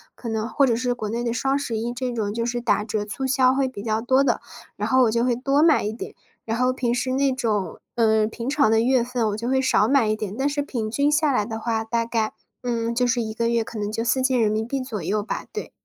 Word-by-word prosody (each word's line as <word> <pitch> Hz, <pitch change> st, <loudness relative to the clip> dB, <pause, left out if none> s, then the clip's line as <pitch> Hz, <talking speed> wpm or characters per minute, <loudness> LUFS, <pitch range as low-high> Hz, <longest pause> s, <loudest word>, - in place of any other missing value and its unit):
可 240 Hz, -, -9 dB
能 225 Hz, 0 st, -2 dB
或 280 Hz, -, +3 dB
者 235 Hz, -, +2 dB
是 245 Hz, +1 st, 0 dB
国 220 Hz, -3 st, -5 dB
内 230 Hz, +3 st, -2 dB
的 235 Hz, -, -1 dB
双 270 Hz, +3 st, 0 dB
十 245 Hz, -6 st, -3 dB
一 235 Hz, +2 st, -2 dB
这 250 Hz, 0 st, -3 dB
种， 215 Hz, -4 st, -2 dB
就 230 Hz, +1 st, -2 dB
是 240 Hz, 0 st, -1 dB
打 220 Hz, -3 st, +1 dB
折 210 Hz, -1 st, -2 dB
促 240 Hz, +6 st, -4 dB
销 260 Hz, -1 st, +3 dB
会 270 Hz, -1 st, +1 dB
比 205 Hz, -6 st, -8 dB
较 220 Hz, 0 st, -1 dB
多 260 Hz, +3 st, +3 dB
的， 275 Hz, -, +1 dB, 0.3 s
然 -, -, -3 dB
后 260 Hz, -1 st, +5 dB
我 225 Hz, -, +3 dB
就 235 Hz, +1 st, +1 dB
会 250 Hz, 0 st, +2 dB
多 275 Hz, +5 st, +2 dB
买 320 Hz, -2 st, +5 dB
一 210 Hz, -, -2 dB
点。 225 Hz, -, -7 dB, 0.3 s
然 225 Hz, -, -2 dB
后 255 Hz, 0 st, +3 dB
平 245 Hz, -2 st, -1 dB
时 250 Hz, +1 st, -1 dB
那 270 Hz, 0 st, +2 dB
种， 220 Hz, -7 st, -2 dB, 0.2 s
嗯， 220 Hz, -2 st, +3 dB
平 230 Hz, +1 st, -6 dB
常 280 Hz, -3 st, +3 dB
的 225 Hz, 0 st, +4 dB
月 245 Hz, +1 st, +3 dB
份 245 Hz, -2 st, -1 dB
我 205 Hz, -, -2 dB
就 230 Hz, +3 st, -4 dB
会 265 Hz, 0 st, +2 dB
少 225 Hz, -5 st, +3 dB
买 270 Hz, -4 st, +3 dB
一 215 Hz, -, +1 dB
点。 210 Hz, -2 st, -5 dB
但 270 Hz, -, +1 dB
是 290 Hz, 0 st, -1 dB
平 230 Hz, -6 st, -3 dB
均 285 Hz, +4 st, +2 dB
下 300 Hz, -1 st, +3 dB
来 250 Hz, -, +2 dB
的 220 Hz, +1 st, -5 dB
话， 225 Hz, -1 st, -1 dB
大 230 Hz, +1 st, -1 dB
概， 225 Hz, -2 st, -1 dB, 0.3 s
嗯， 235 Hz, -2 st, -1 dB
就 245 Hz, +1 st, +1 dB
是 245 Hz, 0 st, +1 dB
一 220 Hz, -1 st, -5 dB
个 230 Hz, +1 st, 0 dB
月 235 Hz, -1 st, +1 dB
可 220 Hz, 0 st, -7 dB
能 205 Hz, 0 st, -2 dB
就 225 Hz, +1 st, -2 dB
¥4000 240 Hz, -1 st, +1 dB
左 245 Hz, -6 st, -5 dB
右 205 Hz, +5 st, -1 dB
吧， -, -, -4 dB
对。 -, -, -6 dB
235 Hz, 285 characters per minute, -23 LUFS, 220-260 Hz, 0.3 s, 后